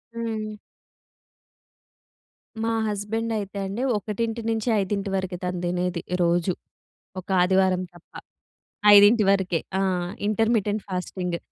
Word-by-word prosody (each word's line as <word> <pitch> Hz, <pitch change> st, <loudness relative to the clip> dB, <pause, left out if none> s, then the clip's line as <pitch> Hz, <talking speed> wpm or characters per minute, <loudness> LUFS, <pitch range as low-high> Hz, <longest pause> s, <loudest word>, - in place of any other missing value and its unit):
హ్మ్. 215 Hz, -2 st, -4 dB, 2.1 s
మా 230 Hz, -, +1 dB, 0.2 s
హస్బెండైతే 210 Hz, 0 st, -3 dB
అండి. 200 Hz, +6 st, -4 dB, 0.2 s
1-5 220 Hz, -2 st, -1 dB
వరకె 185 Hz, -1 st, -2 dB
తను 180 Hz, -1 st, -2 dB
తినేది 180 Hz, 0 st, -1 dB, 0.2 s
రోజు. 175 Hz, +1 st, +2 dB, 0.7 s
ఒక 185 Hz, -, -22 dB
ఆదివారం 185 Hz, 0 st, +3 dB
తప్ప. 175 Hz, -, -19 dB, 0.8 s
5 205 Hz, +2 st, +7 dB
వరకే. 190 Hz, -4 st, +1 dB, 0.2 s
ఆహ్, 180 Hz, -2 st, 0 dB, 0.2 s
ఇంటర్మిటెంట్ 215 Hz, -1 st, +1 dB
ఫాస్టింగ్. 180 Hz, -1 st, -3 dB
200 Hz, 90 wpm, -24 LUFS, 180-220 Hz, 2.1 s, 5